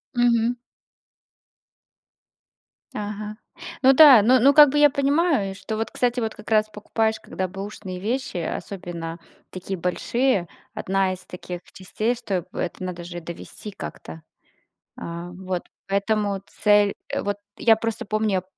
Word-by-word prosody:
Мгм. 240 0 +3 2.4
Ага, 210 0 -5 0.5
ну 265 - +7
да, 270 -6 +9
ну 250 +4 +5
ну 275 +3 +6
как 295 -1 +9
бы 295 - -1
я 295 0 +7
понимаю, 280 - +1
что 215 +2 -5
вот, 225 - -2
кстати, 245 0 0
вот 220 -1 -3
как 210 +1 -11
раз 215 -1 +4
покупаешь 220 +1 -1
когда 185 0 -4
бэушные 195 -1 -7
вещи, 245 +2 -2
особенно 170 -1 -5 0.3
такие 185 0 -5
большие, 195 +3 0 0.3
одна 190 0 0
из 185 - -7
таких 180 -1 -7
частей, 215 +5 -2
что 200 -7 -3
это 180 +1 -4
надо 180 -1 -5
же 175 0 -7
довести 170 +5 -8
как-то. 80 - -9 0.8
А 170 +1 -6
вот 185 -1 -4 0.2
поэтому 200 0 0 0.2
цель 205 -1 +5 0.3
вот 205 0 -2 0.2
я 225 -1 +5
просто 225 +1 -3
помню, 210 -3 0
210 Hz, 130 wpm, -23 LUFS, 185-235 Hz, 2.4 s, да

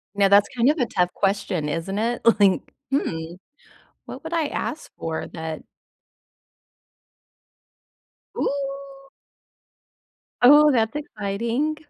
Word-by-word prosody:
Now 200 -1 +4
that's 200 +1 +5
kind 240 +2 +3
of 305 - +2
a 250 - +2
tough 180 -5 0
question, 195 -6 -1
isn't 165 +6 -3
it? 235 +2 -1 0.2
Like, 195 -2 +4 0.3
hmm 165 - -2 0.7
what - - -9
would 320 - -7
I 325 -2 +1
ask 310 - -5
for 160 -1 -4
that 160 -2 -6 2.8
Ooh. 275 0 -4 1.3
Oh, 295 +4 +7
that's 225 -1 +1
exciting. 235 +2 -2
225 Hz, 105 wpm, -23 LUFS, 195-275 Hz, 2.8 s, Oh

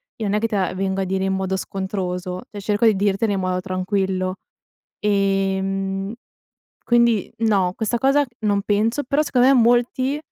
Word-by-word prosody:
io 220 - -4
non 200 - 0
è 210 - +2
che 230 - 0
te 215 - -3
la 185 -2 0
vengo 190 +1 -1
a - - +1
dire 190 0 -1
in 190 - 0
modo 190 0 -1
scontroso, 185 -1 -4
cioè 205 -1 -8
cerco 210 +3 +1
di 215 - +4
dirtela 200 +2 +1
in 195 - -1
modo 185 0 -1
tranquillo. 185 0 -2 0.6
Ehm. 195 -1 0 0.8
Quindi 235 -3 +3
no, 195 -5 +2
questa 230 +1 -1
cosa 275 +3 +3 0.2
non 200 -1 +1
penso, 220 +7 +1
però 280 +3 +1
secondo 255 -4 +2
me - - +6
molti 245 +3 +2
195 Hz, 175 wpm, -21 LUFS, 190-225 Hz, 0.8 s, me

